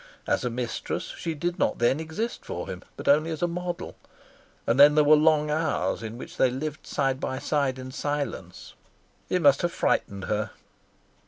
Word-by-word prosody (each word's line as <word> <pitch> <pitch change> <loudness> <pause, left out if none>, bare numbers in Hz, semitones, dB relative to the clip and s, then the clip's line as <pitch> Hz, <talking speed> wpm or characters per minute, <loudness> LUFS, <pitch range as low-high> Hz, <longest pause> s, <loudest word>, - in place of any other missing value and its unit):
As - - +1
a 125 - 0
mistress 120 0 -4
she 165 -1 -4
did 175 +4 -2
not - - +1
then 120 +5 +2
exist 160 +9 -4
for - - -5
him, - - -6 0.2
but - - -8
only 155 +3 +4
as 160 +1 -3
a - - +4
model; 175 0 -4 0.7
and 115 +4 +1
then 145 +1 +9
there 150 - +6
were 150 +1 +7
long 150 -1 +3
hours 155 -5 0
in 115 +1 -6
which - - -9
they 130 - +4
lived 145 +4 -5
side 135 -2 0
by 130 - -3
side 140 -2 0
in 130 0 -7
silence. 140 -11 -4 0.6
It 180 -2 +1
must 140 -1 +6
have 175 - 0
frightened 100 - 0
her. 105 +1 -1
145 Hz, 185 wpm, -26 LUFS, 130-160 Hz, 0.7 s, then